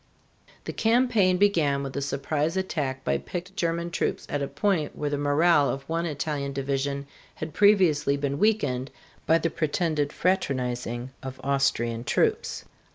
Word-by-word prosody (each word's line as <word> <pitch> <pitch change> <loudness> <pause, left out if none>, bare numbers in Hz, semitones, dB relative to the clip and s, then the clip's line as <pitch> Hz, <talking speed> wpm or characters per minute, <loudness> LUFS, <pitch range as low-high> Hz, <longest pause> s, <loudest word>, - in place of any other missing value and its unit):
The - - -5
campaign 225 -5 +3
began 160 -9 +2
with 135 -1 -6
a 140 - -1
surprise 145 +4 -1
attack 140 -8 -2
by - - 0
picked 180 +2 -6
German 170 -2 -1
troops - - -1
at 145 - -1
a 140 - -1
point 155 +1 -1
where 145 -1 -2
the 145 - 0
morale 145 +1 +4
of 135 0 -4
one 165 +1 -1
Italian 145 -2 -3
division 140 +1 -2 0.3
had 155 0 -6
previously 180 -9 +4
been 140 0 -2
weakened 180 - +1 0.4
by 165 - +5
the 165 -1 -1
pretended 155 -2 0
fraternizing 125 -9 -1
of 130 0 -7
Austrian 120 -4 0
troops. - - 0
145 Hz, 150 wpm, -26 LUFS, 140-175 Hz, 0.4 s, by